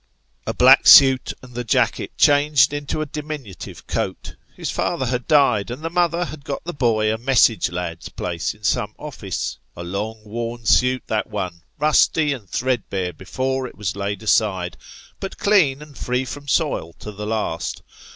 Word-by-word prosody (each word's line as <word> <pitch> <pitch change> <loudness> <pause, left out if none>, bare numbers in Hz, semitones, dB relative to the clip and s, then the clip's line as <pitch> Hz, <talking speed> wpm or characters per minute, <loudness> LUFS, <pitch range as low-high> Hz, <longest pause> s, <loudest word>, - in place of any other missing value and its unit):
A - - -1
black - - +6
suit 130 -2 +8
and 125 -1 -13
the 120 +1 -4
jacket 115 - 0
changed 145 -2 +4
into 145 +1 -3
a - - -1
diminutive 150 - -8
coat. - - -4 0.2
His - - -4
father 130 - -1
had 125 0 -2
died, 140 -9 +3
and 125 +6 -7
the 165 - -3
mother 175 0 +1
had 155 -3 -9
got 140 - -5
the 175 - -5
boy 110 -5 +1
a 110 - -4
message 120 -2 +3
lad's 90 -2 -5
place 85 0 -3
in 105 - -24
some 105 +2 0
office. 110 - -5 0.2
A 85 - -6
long 105 +5 -5
worn 115 +2 -5
suit 125 +3 +3
that 110 -1 -1
one; 90 -5 -4 0.2
rusty 150 0 +3
and 110 -9 -10
threadbare 100 -8 -2
before 130 +10 -3
it - - -14
was 100 -3 -3
laid 100 +1 -4
aside, 95 -5 +1 0.4
but 195 - -6
clean 155 -9 +3
and 150 -2 -15
free 125 +2 -2
from 145 +3 -8
soil 140 - 0
to 105 - -9
the 105 +1 -7
last. 105 -7 -3
120 Hz, 170 wpm, -21 LUFS, 100-145 Hz, 0.4 s, suit